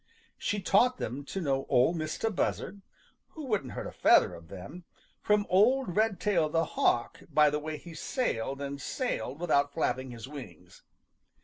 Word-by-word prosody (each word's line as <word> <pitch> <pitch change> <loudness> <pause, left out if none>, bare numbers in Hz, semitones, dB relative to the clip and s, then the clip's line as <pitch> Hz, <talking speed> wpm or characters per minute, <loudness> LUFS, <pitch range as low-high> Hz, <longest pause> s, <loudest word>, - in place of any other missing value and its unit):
She 205 - -1
taught 240 +7 +3
them 130 +5 -4
to 195 - -4
know 135 -5 -1
Ol' 125 +7 +4
Mistah 160 +7 -2
Buzzard, 200 0 -2 0.5
who 310 -2 -7
wouldn't 210 - -1
hurt - - -5
a - - -6
feather - - +4
of 85 -1 -11
them, 100 - -9 0.4
from 210 -1 +2
old 210 +1 +3
Redtail 200 -6 +2
the 165 +1 +1
Hawk 120 - +1
by 150 -1 +5
the 150 - -1
way 155 0 -5
he 170 +1 -11
sailed 140 - -2
and 140 0 -5
sailed 145 - -3
without 145 -4 +1
flapping 130 0 -1
his 115 -2 -8
wings. 130 - -11
155 Hz, 165 wpm, -30 LUFS, 135-200 Hz, 0.5 s, by